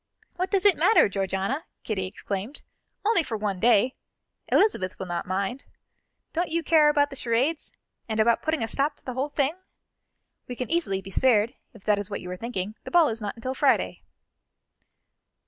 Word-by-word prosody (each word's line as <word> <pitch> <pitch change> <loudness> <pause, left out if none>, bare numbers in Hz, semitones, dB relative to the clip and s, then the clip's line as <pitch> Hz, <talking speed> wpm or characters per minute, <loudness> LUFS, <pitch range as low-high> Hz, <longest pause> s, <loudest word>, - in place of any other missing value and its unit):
"What 370 +2 -2
does 395 -1 +1
it 405 - +6
matter, 445 - +5
Georgiana," 195 - -2 0.2
Kitty 190 -4 -2
exclaimed, 200 +6 -5 0.4
"only 425 -4 +4
for 235 -8 -4
one 205 -3 -2
day! 240 +3 +4 0.5
Elizabeth 190 - +2
will 190 - -5
not 175 -1 -4
mind. 195 +8 -3 0.7
Don't 345 +1 -1
you 335 +1 0
care 310 -3 +5
about 290 -1 +2
the - - -7
charades, 260 +6 0 0.4
and 220 0 -1
about 230 +1 +3
putting 315 -5 -1
a - - -1
stop 285 +5 0
to - - -18
the 255 - -4
whole 265 +4 -2
thing? 285 0 0 0.9
We 245 - -5
can 250 +4 -5
easily 325 - 0
be 195 - -9
spared, 230 0 +3 0.2
if 210 - -14
that 210 -1 +2
is 205 0 -2
what 200 - -4
you 180 - -7
are - - -3
thinking; 210 -2 -4
the - - -7
ball 340 -4 +5
is 225 0 -3
not 205 -1 -4
until 255 +3 -4
Friday." - - +1
235 Hz, 185 wpm, -26 LUFS, 200-300 Hz, 0.9 s, it